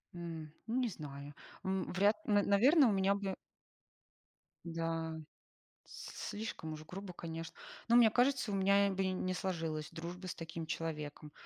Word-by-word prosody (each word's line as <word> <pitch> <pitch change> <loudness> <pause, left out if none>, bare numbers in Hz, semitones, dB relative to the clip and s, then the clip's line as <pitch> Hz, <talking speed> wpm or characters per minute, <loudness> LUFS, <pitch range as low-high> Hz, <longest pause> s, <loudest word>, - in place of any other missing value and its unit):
М, 165 -3 -6 0.2
ну 225 - -1
не 255 -2 +2
знаю, 145 -5 -7 0.3
м, 190 -1 0
вряд, 200 +3 +4
на 205 -4 +4
наверное, 260 - +6
у - - +3
меня 195 0 +3
бы 195 -2 -2 1.3
Да. 165 -1 -2 0.7
С - - -7
слишком 205 -7 -4
уж 155 0 -9
грубо, 185 +2 -7
конечно. 165 -1 -6 0.3
Но 235 - +6
мне 235 -2 +8
кажется, 250 -1 +2
у - - 0
меня, 200 +1 +5
э, - - 0
бы 190 0 0
не 185 0 -1
сложилась 160 -5 -2
дружба 175 +3 -6
с - - -3
таким 165 0 -5
человеком, 150 -2 -4
185 Hz, 155 wpm, -35 LUFS, 160-200 Hz, 1.3 s, мне